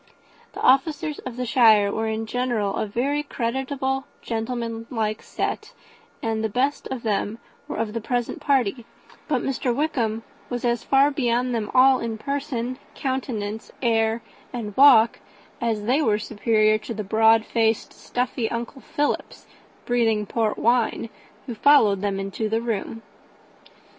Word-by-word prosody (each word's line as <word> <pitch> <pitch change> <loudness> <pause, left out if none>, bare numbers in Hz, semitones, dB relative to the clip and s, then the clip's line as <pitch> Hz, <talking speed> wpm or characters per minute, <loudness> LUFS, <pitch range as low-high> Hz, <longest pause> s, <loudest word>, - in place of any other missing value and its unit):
The - - -7
officers 295 +3 +2
of 245 -1 -7
the 250 - -2
shire 220 -4 +5
were 220 +1 -2
in 220 0 -2
general 230 -4 -1
a - - -1
very 275 +8 0
creditable, 265 +1 -2 0.2
gentlemanlike 225 -1 -3
set - - -4 0.5
and 220 -1 -1
the 220 - 0
best 270 +7 0
of 260 -3 -5
them 210 0 -1 0.3
were - - -5
of 215 -1 -2
the 230 - -3
present 245 +1 -2
party; 250 -4 +1 0.4
but 265 -6 0
Mr, 255 -2 -1
Wickham 235 -7 -1 0.3
was 245 0 -3
as 235 -1 0
far 275 +1 +4
beyond 250 -2 0
them 220 -3 -2
all 260 +1 +6
in 230 -1 -3
person, 260 -1 -3 0.2
countenance, 230 -5 -3
air, 225 -1 +1 0.3
and 215 -5 -5
walk, 250 -5 +6 0.4
as 225 -3 -1
they 255 +8 +2
were 215 -7 +2
superior 215 0 +2
to 230 +1 -6
the 215 - -3
broad 220 +2 +4
faced 225 -1 0
stuffy 245 -2 -2
uncle 235 +3 -5
Philips, 290 0 -2 0.4
breathing 225 -3 +1
port 220 +1 -1
wine, 235 -1 +1 0.4
who 245 - -5
followed 215 -5 +4
them 200 -1 -1
into 195 +3 -3
the 225 +1 +1
room. 225 -1 -4
230 Hz, 145 wpm, -24 LUFS, 220-255 Hz, 0.5 s, all